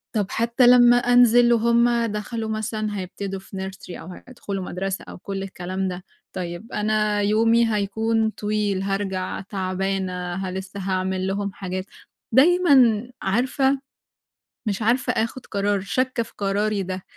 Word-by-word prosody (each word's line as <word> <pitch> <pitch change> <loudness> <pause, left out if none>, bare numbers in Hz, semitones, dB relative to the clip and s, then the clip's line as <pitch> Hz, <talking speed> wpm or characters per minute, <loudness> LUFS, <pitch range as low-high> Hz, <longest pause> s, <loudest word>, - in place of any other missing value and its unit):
طَب، 210 - +2
حتى 235 +2 +2
لمّا 245 -1 +7
أنزل 245 -1 +5
وهُم 235 +1 +3
دخلوا 220 +1 -4
مثلًا 215 -1 -3
هيبتدوا 195 +1 -5
في 190 0 -6
nursery 190 -2 -10
أو - - -10 0.2
هيدخلوا 200 -6 -5
مدرسة 190 +1 -4
أو - - -9
كُل 195 +1 -5
الكلام 190 0 -4
ده. 180 0 -5 0.3
طيب، 180 +4 -6
أنا 210 0 +1
يومي 225 +2 +3
هيكون 220 +2 0
طويل، 210 -2 -1
هارجع 195 -1 -2
تعبانة، 185 -2 -3
ه 190 -1 -3
لسَّه 190 +1 -6
هاعمل 190 0 -1
لهم 200 0 -2
حاجات. 185 -1 -5 0.5
دايمًا 265 -7 +5
عارفة، 265 +6 +1 0.9
مش 200 +1 -2
عارفة 240 +4 +2
آخد 230 +3 -2
قرار 200 0 0
شاكَّة 255 +5 -1
في 225 - -11
قراري 205 +1 0
ده. 185 0 -5
205 Hz, 135 wpm, -23 LUFS, 190-230 Hz, 0.9 s, لمّا